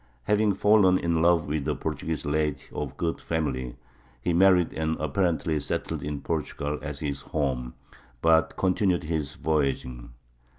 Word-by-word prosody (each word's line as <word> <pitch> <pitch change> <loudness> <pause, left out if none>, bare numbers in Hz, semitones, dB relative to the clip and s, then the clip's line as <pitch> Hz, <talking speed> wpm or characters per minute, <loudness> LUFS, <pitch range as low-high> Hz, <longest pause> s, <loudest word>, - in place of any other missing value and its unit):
Having 105 - +2
fallen 100 -2 +5
in 85 -2 0
love 85 -2 +3
with 75 -1 -2
a - - 0
Portuguese 80 -1 -3
lady 75 -2 0
of 70 -2 -5
good 85 -1 -2
family, 65 -6 -2 0.4
he 85 +7 -1
married 90 -1 +4
and 80 0 -1
apparently 80 0 0
settled 70 - -3
in 75 -1 -4
Portugal 75 -2 -3
as 75 -2 -6
his 70 -2 -3
home, 65 -6 -2 0.4
but 80 +2 +3
continued 90 -1 +1
his 75 -2 -3
voyaging. 70 -7 -1
80 Hz, 140 wpm, -26 LUFS, 70-85 Hz, 0.4 s, fallen